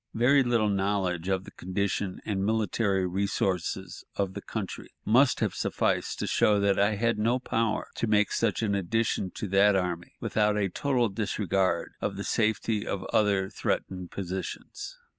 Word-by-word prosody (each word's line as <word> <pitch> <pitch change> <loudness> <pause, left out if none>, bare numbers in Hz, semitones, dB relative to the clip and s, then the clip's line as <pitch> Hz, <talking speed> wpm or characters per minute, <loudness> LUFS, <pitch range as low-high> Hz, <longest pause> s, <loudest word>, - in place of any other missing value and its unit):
Very 130 +5 +5
little 120 -4 +2
knowledge 95 -3 0
of 95 -1 0
the - - -11
condition 95 +1 -2
and 100 -3 -1
military 105 -2 +1
resources 95 -1 -2
of 100 -2 -1
the - - -6
country - - -5 0.2
must 130 +5 +4
have - - +1
sufficed - - 0
to - - -2
show 105 -1 +3
that 100 -1 +2
I 100 +1 +3
had 115 +1 +1
no 115 +4 +2
power 115 -3 -1
to 115 - 0
make 105 -1 +3
such 115 0 0
an 105 -2 +1
addition 100 0 0
to 105 - -4
that 100 +1 +5
army 90 -2 -2
without 105 -1 +1
a 100 -2 +1
total 125 +3 +1
disregard 95 -3 0
of 100 - -2
the 100 - -3
safety 110 -1 0
of 95 - -2
other 100 -2 +2
threatened 90 -3 -2
positions. 95 - -6
100 Hz, 160 wpm, -28 LUFS, 95-110 Hz, 0.2 s, Very